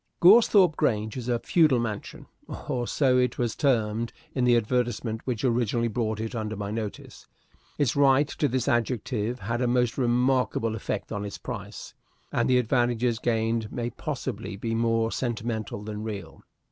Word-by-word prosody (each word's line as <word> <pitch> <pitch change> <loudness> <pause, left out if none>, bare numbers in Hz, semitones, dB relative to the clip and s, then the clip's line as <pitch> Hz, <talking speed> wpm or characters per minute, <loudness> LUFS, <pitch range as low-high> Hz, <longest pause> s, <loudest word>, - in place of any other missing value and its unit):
Goresthorpe 195 -3 +6
Grange 110 -7 0
is 125 -1 -5
a 120 - +2
feudal 155 +1 +3
mansion 110 -3 -4 0.4
or 120 -2 -1
so 130 -3 +3
it 125 0 +1
was 120 -2 -1
termed 115 -5 +1 0.2
in 130 -2 +1
the 120 -1 +5
advertisement 120 -1 -1
which 120 -5 -2
originally 120 -1 +1
brought 110 -1 -2
it 110 0 -4
under 110 -2 -3
my 100 0 -4
notice. 110 -2 -6 0.5
Its 140 -5 +1
right 140 0 +4
to 145 - -1
this 130 -1 -1
adjective 120 -1 -1
had 115 +5 -2
a 125 - +2
most 125 0 +1
remarkable 125 -2 +1
effect 105 -2 -4
upon 105 -2 -3
its 100 -1 -6
price, 105 -4 -7 0.4
and - - +1
the 125 - +5
advantages 120 -1 +1
gained 115 -1 0
may 120 0 -3
possibly 130 - -5
be 115 +3 -3
more 115 0 +1
sentimental 115 -4 -3
than 105 0 -5
real. 100 -7 -7
120 Hz, 160 wpm, -26 LUFS, 110-125 Hz, 0.5 s, Goresthorpe